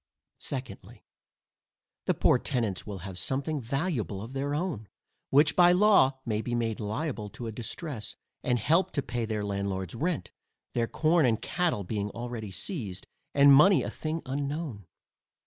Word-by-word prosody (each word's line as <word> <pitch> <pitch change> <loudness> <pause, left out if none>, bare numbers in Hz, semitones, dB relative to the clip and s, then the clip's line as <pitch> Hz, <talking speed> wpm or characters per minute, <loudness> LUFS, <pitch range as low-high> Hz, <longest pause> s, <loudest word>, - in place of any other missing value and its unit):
Secondly, 130 -7 -7 1.0
The - - +3
poorer 125 - +4
tenants 115 -9 -2
will 100 -2 -5
have 95 -2 -6
something 140 +2 -1
valuable 125 - -2
of 115 +6 -8
their 140 +2 -1
own, 150 - -3 0.4
which 150 +2 +5
by 175 0 +7
law 185 -9 +5
may 110 -2 0
be 120 +1 -2
made 115 -2 -1
liable 110 0 -3
to 115 +4 -8
a 115 - -3
distress, 120 +2 -5 0.3
and 125 - +1
help 160 - +2
to 140 - 0
pay 120 -2 -2
their 110 -2 -2
landlord's 100 -2 -2
rent, 160 +6 -2 0.4
their 115 -1 +1
corn 155 0 +3
and 115 -2 +2
cattle 175 - -1
being 105 +2 -2
already 115 -1 -5
seized, 100 - -4 0.3
and 140 0 +8
money 150 0 +7
a 105 - -4
thing 155 +5 -4
unknown. 140 - -4
125 Hz, 155 wpm, -29 LUFS, 105-150 Hz, 1.0 s, and